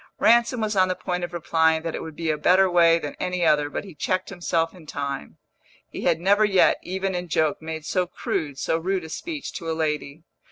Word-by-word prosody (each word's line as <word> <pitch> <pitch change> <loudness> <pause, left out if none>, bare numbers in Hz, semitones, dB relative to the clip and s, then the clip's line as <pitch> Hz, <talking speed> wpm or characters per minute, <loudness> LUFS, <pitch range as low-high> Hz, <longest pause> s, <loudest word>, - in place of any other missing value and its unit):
Ransom 235 +1 +4
was 215 -1 -1
on 185 -1 +4
the 185 - -1
point 180 -1 -3
of 175 - -4
replying 160 -1 +1
that 165 -1 -3
it - - -4
would 160 -2 -8
be 165 -1 -1
a - - 0
better 185 +5 +5
way 170 -2 +5
than 150 -3 -5
any 180 -1 -1
other, 150 -2 +3
but - - -4
he 195 -3 -11
checked 185 +5 -2
himself 170 -3 -1
in 175 -4 -15
time; 140 - -5 0.5
he - - -6
had 160 - +3
never 200 +4 +3
yet, 195 -3 +4
even 190 +1 -3
in 180 0 -3
joke, 155 -1 0
made 160 -1 -6
so 180 +1 0
crude, 145 -4 -3
so 160 - 0
rude 185 +1 -1
a 160 - -8
speech 305 - -6
to 165 - -5
a - - 0
lady. 150 -1 -2
170 Hz, 230 wpm, -24 LUFS, 160-185 Hz, 0.5 s, better